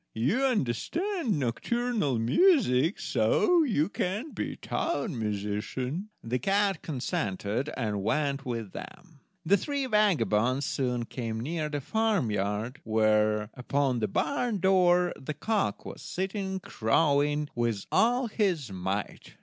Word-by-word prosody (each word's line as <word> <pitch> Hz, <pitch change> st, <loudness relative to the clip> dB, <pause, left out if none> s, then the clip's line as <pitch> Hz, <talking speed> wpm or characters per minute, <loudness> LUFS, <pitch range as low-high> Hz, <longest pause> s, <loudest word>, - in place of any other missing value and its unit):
You 145 Hz, -, +1 dB
understand 255 Hz, -, 0 dB
nocturnal 150 Hz, -, 0 dB
music, 165 Hz, -, +3 dB
so 360 Hz, -3 st, +3 dB
you 205 Hz, -, +2 dB
can 210 Hz, -, -3 dB
be -, -, -4 dB
town 225 Hz, -, -2 dB
musician." 110 Hz, -, -3 dB
The 125 Hz, +2 st, -1 dB
cat 195 Hz, 0 st, +1 dB
consented, 120 Hz, -, -2 dB
and 105 Hz, -5 st, -1 dB
went 140 Hz, +5 st, 0 dB
with 115 Hz, -6 st, -4 dB
them. 175 Hz, -5 st, -10 dB, 0.3 s
The 200 Hz, +5 st, +5 dB
three 280 Hz, +7 st, -2 dB
vagabonds 135 Hz, -, +2 dB
soon 125 Hz, -5 st, -1 dB
came 115 Hz, -2 st, -4 dB
near 155 Hz, +5 st, -2 dB
a 145 Hz, -, -1 dB
farmyard, 120 Hz, -, -1 dB
where, 110 Hz, -1 st, +2 dB
upon 130 Hz, 0 st, 0 dB
the 110 Hz, -, 0 dB
barn 240 Hz, -, 0 dB
door, 180 Hz, -1 st, +4 dB
the 145 Hz, +3 st, -5 dB
cock 210 Hz, +7 st, -1 dB
was -, -, -8 dB
sitting 190 Hz, 0 st, -3 dB
crowing 145 Hz, +3 st, +1 dB
with 115 Hz, -4 st, -1 dB
all 245 Hz, +3 st, +3 dB
his 180 Hz, -, 0 dB
might. 95 Hz, +2 st, -4 dB
145 Hz, 120 wpm, -28 LUFS, -, 0.3 s, The